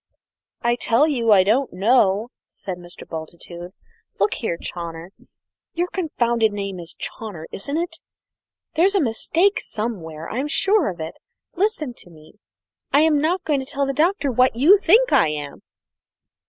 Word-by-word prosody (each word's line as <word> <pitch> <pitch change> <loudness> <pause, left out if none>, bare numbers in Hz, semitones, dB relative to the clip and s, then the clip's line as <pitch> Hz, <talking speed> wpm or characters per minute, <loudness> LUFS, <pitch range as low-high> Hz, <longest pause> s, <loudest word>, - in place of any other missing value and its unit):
"I 240 0 +2
tell 240 +6 +3
you 240 -7 +1
I 195 -3 +7
don't 240 +8 +1
know!" 205 +1 +2 0.2
said 185 -2 -7
Mr. 175 0 -12
Bultitude. 170 +2 -8 0.5
"Look - - +2
here, 175 -8 -3
Chawner 170 0 -6 0.7
your 350 +1 0
confounded 235 - +1
name 200 -2 -4
is 170 0 -9
Chawner, 200 -8 -7
isn't 280 +10 -4
it? 335 -1 -3 0.7
there's 380 +5 +3
a - - +4
mistake 330 - +1
somewhere, 165 -8 -5
I'm 265 +5 -2
sure 390 - +2
of 180 -2 -7
it. 160 +1 -6 0.3
Listen 355 - -1
to - - -11
me. 160 +5 -18 0.5
I'm 300 0 +4
not 345 +4 0
going 295 -3 +1
to 265 - -5
tell 280 0 -1
the 275 - -2
Doctor 315 0 +1
what 255 0 +3
you 330 - +6
think 455 +7 +4
I - - +5
am!" 145 -2 -5
235 Hz, 155 wpm, -22 LUFS, -, 0.7 s, I